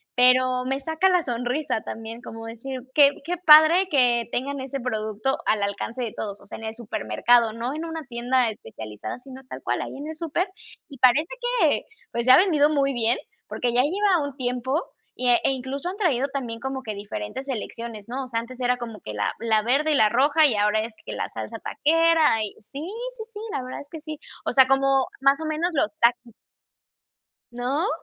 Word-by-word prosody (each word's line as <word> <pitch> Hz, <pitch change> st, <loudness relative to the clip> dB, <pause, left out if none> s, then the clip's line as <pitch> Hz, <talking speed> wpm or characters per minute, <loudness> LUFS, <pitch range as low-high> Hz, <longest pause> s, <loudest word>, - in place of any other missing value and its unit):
pero 255 Hz, 0 st, +4 dB
me 270 Hz, +1 st, -1 dB
saca 320 Hz, +6 st, +1 dB
la 360 Hz, -1 st, +3 dB
sonrisa 245 Hz, +1 st, -2 dB
también, 225 Hz, +1 st, -7 dB
como 225 Hz, -1 st, -9 dB
decir: 250 Hz, +3 st, -6 dB
"Qué 285 Hz, -1 st, +7 dB
qué 350 Hz, +3 st, -3 dB
padre 315 Hz, +5 st, +8 dB
que 245 Hz, -6 st, +3 dB
tengan 275 Hz, +2 st, -2 dB
ese 270 Hz, +1 st, -4 dB
producto 220 Hz, +1 st, -1 dB
al 210 Hz, -1 st, +2 dB
alcance 225 Hz, +5 st, -3 dB
de 225 Hz, -, -3 dB
todos", 200 Hz, -2 st, -5 dB
o -, -, -17 dB
sea, -, -, -8 dB
en 225 Hz, -, -7 dB
el 220 Hz, 0 st, -5 dB
supermercado, 225 Hz, -, +1 dB
no 235 Hz, +4 st, -3 dB
en 320 Hz, +2 st, -4 dB
una 325 Hz, -1 st, -5 dB
tienda 245 Hz, 0 st, +1 dB
especializada, 110 Hz, -, -8 dB
sino 265 Hz, 0 st, -12 dB
tal -, -, -7 dB
cual -, -, -1 dB
ahí -, -, -6 dB
en 290 Hz, +2 st, -7 dB
el 315 Hz, -, -6 dB
súper. 335 Hz, +3 st, -1 dB, 0.4 s
Y 275 Hz, -, -11 dB
parece 265 Hz, +5 st, +5 dB, 0.3 s
que, -, -, +3 dB, 0.3 s
pues, 235 Hz, 0 st, -2 dB
se 255 Hz, -, +7 dB
ha -, -, +9 dB
vendido 310 Hz, -6 st, +4 dB
muy 275 Hz, -2 st, +1 dB
bien, 235 Hz, 0 st, +2 dB, 0.3 s
porque 245 Hz, -, -2 dB
ya 250 Hz, -, +4 dB
lleva 360 Hz, -1 st, +2 dB
un 280 Hz, -, -9 dB
tiempo, 255 Hz, +5 st, -1 dB, 0.3 s
y 250 Hz, 0 st, 0 dB
e 240 Hz, -, +5 dB
incluso, 270 Hz, +4 st, -4 dB
han 385 Hz, -, -6 dB
traído 280 Hz, -, +1 dB
también 245 Hz, -4 st, -4 dB
como 265 Hz, +1 st, -4 dB
que 215 Hz, -2 st, -5 dB
diferentes 200 Hz, -, -6 dB
selecciones, 230 Hz, -3 st, -6 dB
¿no? 265 Hz, +2 st, -3 dB
O -, -, -8 dB
sea, 230 Hz, -2 st, -1 dB
antes 255 Hz, +2 st, -11 dB
era 250 Hz, 0 st, +2 dB
como 230 Hz, -3 st, -7 dB
que 105 Hz, -, -7 dB
la 105 Hz, 0 st, -1 dB
la 220 Hz, -2 st, +2 dB
verde 280 Hz, +7 st, +2 dB
y 295 Hz, -, +3 dB
la 215 Hz, -4 st, +5 dB
roja, 285 Hz, +6 st, +4 dB
y 245 Hz, -7 st, +3 dB
ahora 210 Hz, +1 st, +2 dB
es, 225 Hz, 0 st, -5 dB
que -, -, -5 dB
la -, -, -3 dB
salsa -, -, -6 dB
taquera, 320 Hz, -7 st, +3 dB
y 210 Hz, -, -3 dB
sí, 275 Hz, +7 st, -9 dB, 0.4 s
sí, 445 Hz, -, -5 dB
sí, 415 Hz, -, -7 dB
la 260 Hz, -, -2 dB
verdad 255 Hz, -, -6 dB
es 285 Hz, -, -14 dB
que 320 Hz, 0 st, -9 dB
sí, 310 Hz, -1 st, -7 dB, 0.3 s
o -, -, 0 dB
sea, 260 Hz, 0 st, +6 dB
como, 270 Hz, 0 st, +3 dB
más 275 Hz, +1 st, +4 dB
o 320 Hz, -, -3 dB
menos, 325 Hz, +3 st, -1 dB
los 215 Hz, -, +1 dB
Takis. 235 Hz, -1 st, +2 dB, 1.2 s
¿No? 255 Hz, +9 st, -1 dB
255 Hz, 210 wpm, -24 LUFS, 230-290 Hz, 1.2 s, ha